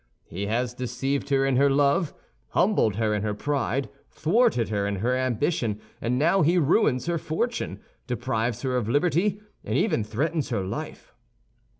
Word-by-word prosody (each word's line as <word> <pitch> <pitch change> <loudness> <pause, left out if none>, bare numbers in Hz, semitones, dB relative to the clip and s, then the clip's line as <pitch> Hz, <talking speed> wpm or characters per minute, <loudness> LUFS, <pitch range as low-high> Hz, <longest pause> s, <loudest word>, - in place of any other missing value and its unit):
He 100 +4 -5
has 120 +3 -1
deceived 135 +3 -2
her 135 -1 +3
in 135 -2 +2
her 140 +1 +5
love, 145 +4 +2 0.3
humbled 185 - +2
her 110 -1 +1
in 105 - 0
her 105 0 -2
pride, 135 +1 -1 0.2
thwarted 170 - +2
her 100 -2 0
in 100 - -1
her 120 +7 0
ambition; 130 -3 0 0.2
and 125 +2 0
now 170 +7 +3
he 170 +4 +3
ruins 150 - +3
her 170 -1 0
fortune, 235 +12 -2 0.3
deprives 120 -1 -2
her 130 -1 0
of 115 -3 -1
liberty, 175 - +2 0.2
and - - -1
even 155 - +1
threatens 145 +9 -1
her 110 -6 -1
life. 95 - -6
130 Hz, 165 wpm, -26 LUFS, 115-155 Hz, 0.3 s, her